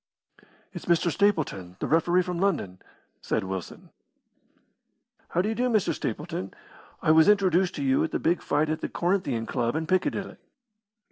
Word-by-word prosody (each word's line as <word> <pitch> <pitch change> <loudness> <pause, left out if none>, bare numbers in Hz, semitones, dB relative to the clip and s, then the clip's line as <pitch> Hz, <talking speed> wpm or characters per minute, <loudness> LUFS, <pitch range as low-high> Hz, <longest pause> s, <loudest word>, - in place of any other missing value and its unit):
"It's - - -8
Mr. 170 0 +2
Stapleton, 150 - 0
the - - -2
referee 175 +3 +3
from 180 -1 -4
London," 155 - -1 0.4
said - - -1
Wilson. 95 -2 -7 1.4
"How 180 - +1
do 210 - -1
you - - 0
do, 250 +2 0
Mr. 215 -5 +2
Stapleton? 150 - -5 0.5
I 155 - +4
was 160 +3 +6
introduced 190 -3 +3
to - - -3
you 275 +3 +2
at 325 - -1
the - - -1
big 170 +1 0
fight 150 +2 0
at 155 - -3
the - - -3
Corinthian 170 - -1
Club 120 +2 -1
in 160 0 -1
Piccadilly." 185 +3 -1
170 Hz, 160 wpm, -26 LUFS, 150-195 Hz, 1.4 s, was